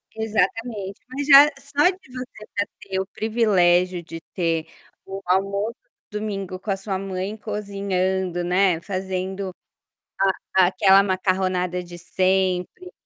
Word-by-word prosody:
Exatamente, 220 -1 -1
mas 275 +2 -4
já 280 0 +10
só 285 +4 +2
de 370 -8 -9
você 250 -4 -8
já 200 - +2 0.2
ter 190 -1 -3
o 190 - -1
privilégio 185 -5 +2
de 165 0 -8
ter 165 -3 0 0.4
o 195 0 -6
almoço 200 +5 0 0.4
de 210 - -3
domingo 195 -3 -4
com 200 - -4
a 195 - 0
sua 195 0 -3
mãe 195 +2 -4
cozinhando, 190 -4 -2
né, 180 -1 +2
fazendo 190 0 -3 1.0
a 190 -1 +6
aquela 195 +1 +5
macarronada 185 -2 0
de 175 0 -10
sempre 185 - 0
190 Hz, 130 wpm, -23 LUFS, 185-215 Hz, 1.0 s, já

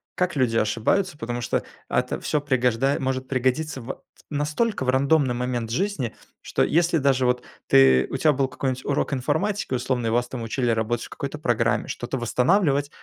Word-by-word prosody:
как 180 -1 0
люди 125 -5 +1
ошибаются. 145 - +1
Потому 120 -1 -4
что 120 - -1 0.3
это - - 0
ат - - -15
всё 150 - 0
пригожда 130 -1 +1
может 130 -1 -2
пригодиться 130 +3 0
в 120 +4 -7 0.3
настолько 150 - -1
в 130 - -1
рандомный 135 0 +3
момент 120 -2 -2
жизни, 145 - -1 0.3
что - - 0
если 170 +1 +2
даже 135 -3 +2
вот 125 0 +1 0.2
ты, 65 -1 +5
у - - -2
тя 150 +2 +3
был 135 -1 +1
какой-нибудь 130 0 -3
урок 145 0 0
информатики 160 +8 -1
условно 125 -1 -1
и - - +1
вас 120 +2 +1
учили 120 0 -1
работать 115 +1 -1
в - - -12
какой-то - - -5
программе, - - +1
что-то - - -4
восстанавливать, 140 - +2
130 Hz, 175 wpm, -24 LUFS, 120-145 Hz, 0.3 s, ты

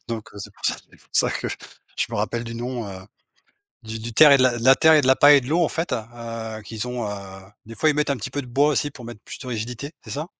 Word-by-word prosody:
donc 115 -2 -5
heu, - - -15
c'est 100 - -8
pour - - -19 0.5
ça - - +3
que - - -3
je - - -6
me - - -5
rappelle 120 0 -2
du 115 0 -7
nom, 120 -1 -4
heu, 95 -1 -8 0.8
du 110 0 -6
du 115 +1 -6
terre 150 +4 +8
et - - +8
de 130 - +3
la 125 +1 +4
terre 160 +2 +5
et 155 - +6
de 130 - -1
la 130 - +6
paille 145 +1 +7
et - - -1
de 125 - -10
l'eau 170 +3 +2
en 160 - +2
fait, 165 -2 -3
heu, 115 -1 -6
qui 110 - -9
sont, 125 0 -3
heu, - - -4 0.6
des 115 0 -10
fois 155 - +2
ils 150 - +2
mettent 150 -1 0
un 140 - +1
petit 110 - -6
peu 145 - -3
de - - -12
bois 140 +5 +3
aussi 145 0 0
pour 125 -3 -12
mettre 115 -3 -9
plus - - -9
de 130 - -10
rigidité, 125 +5 -5
c'est - - -12
ça? 150 +4 -4
125 Hz, 285 wpm, -23 LUFS, 115-145 Hz, 0.8 s, terre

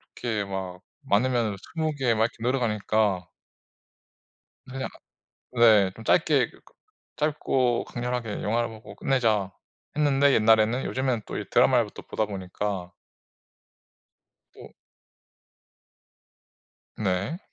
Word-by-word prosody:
개 110 -4 -2
막 95 -2 -5 0.2
많으면은 115 -1 +1 0.2
20 160 -1 0
개 130 -4 +1
막 110 0 +2
이렇게 115 - -6
늘어가니까 110 -6 0 1.5
그냥 135 0 -4 0.7
네 110 -5 +5
좀 115 - -11
짧게 145 -7 +3
그 - - -19 0.6
'짧고 135 -5 +1
강렬하게 120 -3 -4
영화를 115 +2 0
보고 110 -1 -12
끝내자.' 110 -8 +1 0.4
했는데 140 -2 +3
옛날에는 110 +3 +4
요즘에는 130 -4 -1
또 - - -5
이 - - -4
드라마를 - - +4
또 - - -8
보다 110 - -2
보니까 95 -1 -4 1.6
또 - - -13 2.3
네. 100 - -1
115 Hz, 210 characters per minute, -26 LUFS, 105-130 Hz, 2.3 s, 네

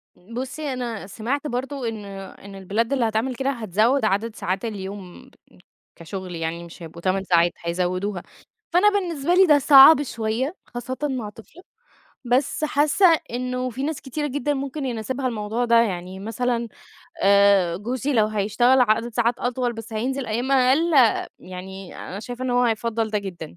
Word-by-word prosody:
بُصّي 255 +8 -5
أنا 235 -6 -5
سمعت 250 +9 -3
برضو 265 +1 -4
إن 220 -3 -4
إن 195 0 -10
البلاد 210 +7 -1
اللي 250 -4 +1
هتعمل 225 +4 -1
كده 270 +3 -1
هتزوّد 225 +1 +1
عدد 215 +2 0
ساعات 190 +4 -3
اليوم، 195 -3 -7 0.7
كشغل 180 +2 -7
يعني 165 +1 -4
مش 170 0 -12
هيبقوا 165 +1 -10
8 190 +2 0
ساعات، 175 -2 +3
هيزوّدوها، 180 +2 -2 0.5
فأنا 395 +4 +6
بالنسبة 350 -6 -1
لي 380 +1 +7
ده 295 -2 +6
صعب 285 +2 +8
شوية 235 - -2
خاصّةً 245 +2 -6
مع 255 -7 -2
طفلة، 225 - -15 0.6
بس 255 +5 +1
حاسّة 300 +6 +2 0.3
إنه 250 +1 -2
في 255 +3 -5
ناس 310 0 -3
كتيرة 295 +3 -3
جدًا 290 +1 -1
ممكن 275 +1 -4
يناسبها 255 +2 -3
الموضوع 225 +1 -2
ده، 235 - +3
يعني 185 -2 -5
مثلًا 235 +3 -2 0.6
آآ 200 -3 +4
جوزي 250 +8 -2
لو 220 -4 +3
هيشتغل 215 +5 +2
عدد 230 0 +1
ساعات 240 0 +2
أطول 245 0 -1
بس 225 0 -9
هينزل 255 +4 -2
أيام 240 +5 -1
أقل 270 +6 +3 0.5
يعني 185 +1 -9
أنا 195 +3 -7
شايفة 245 +2 -6
إن 255 - -1
هو 245 0 +3
هيفضّل 225 -1 -1
ده 210 - 0
جدًا، 175 - -8
230 Hz, 160 wpm, -23 LUFS, 200-265 Hz, 0.7 s, صعب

